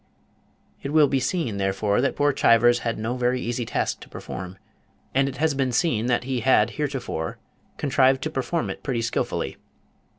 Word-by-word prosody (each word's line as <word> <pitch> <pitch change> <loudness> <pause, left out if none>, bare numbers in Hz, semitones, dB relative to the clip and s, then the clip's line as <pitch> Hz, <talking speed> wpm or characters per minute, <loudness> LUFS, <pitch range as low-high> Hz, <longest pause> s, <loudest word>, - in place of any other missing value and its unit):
It 140 - -4
will 155 -2 +6
be 135 0 +1
seen, 130 - -1
therefore, 100 +3 +1
that 135 - 0
poor 145 0 +2
Chivers 120 -1 +4
had 115 0 -2
no 115 +3 -2
very 125 0 +1
easy 120 -1 -3
task - - -1
to - - -13
perform, 95 0 -7 0.6
and 135 +1 +2
it 130 - -8
has 155 0 +2
been 135 -2 0
seen 120 -5 +1
that 120 -1 +1
he 130 -1 -2
had 115 -2 +3
heretofore 135 - -3 0.4
contrived 135 -2 +3
to - - -2
perform 160 +5 -2
it - - -8
pretty 125 -5 -2
skilfully. 115 - -2
125 Hz, 175 wpm, -24 LUFS, 115-140 Hz, 0.6 s, will